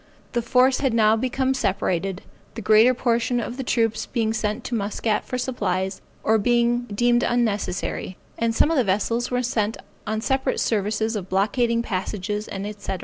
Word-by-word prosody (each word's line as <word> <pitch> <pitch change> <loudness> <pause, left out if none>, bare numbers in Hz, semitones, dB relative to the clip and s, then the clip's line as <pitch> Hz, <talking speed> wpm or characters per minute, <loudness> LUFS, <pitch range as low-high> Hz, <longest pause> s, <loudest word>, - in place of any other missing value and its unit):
The 240 - 0
force 255 +2 +3
had 265 -5 +1
now 220 -1 +5
become 260 +3 0
separated, 190 -5 -1 0.3
the 225 - -5
greater 220 +5 +5
portion 240 0 +1
of 240 +1 -5
the 265 - -3
troops 225 -3 0
being 225 -3 0
sent 215 +2 -2
to - - -5
Muscat 210 0 -1
for 255 - -3
supplies, 190 -7 -2 0.2
or 220 0 +3
being 240 +2 +2
deemed 240 +2 +2
unnecessary, 210 -6 -1 0.2
and 230 0 0
some 310 - +3
of 325 - +1
the 255 - +4
vessels 225 +4 0 0.2
sent 220 -2 -1 0.3
on 215 0 -1
separate 265 +3 0
services 220 +1 0
of 190 -3 -5
blockading 230 +4 +1
passages, 205 +1 -3 0.3
&c. 200 - -4
225 Hz, 160 wpm, -23 LUFS, 210-240 Hz, 0.3 s, now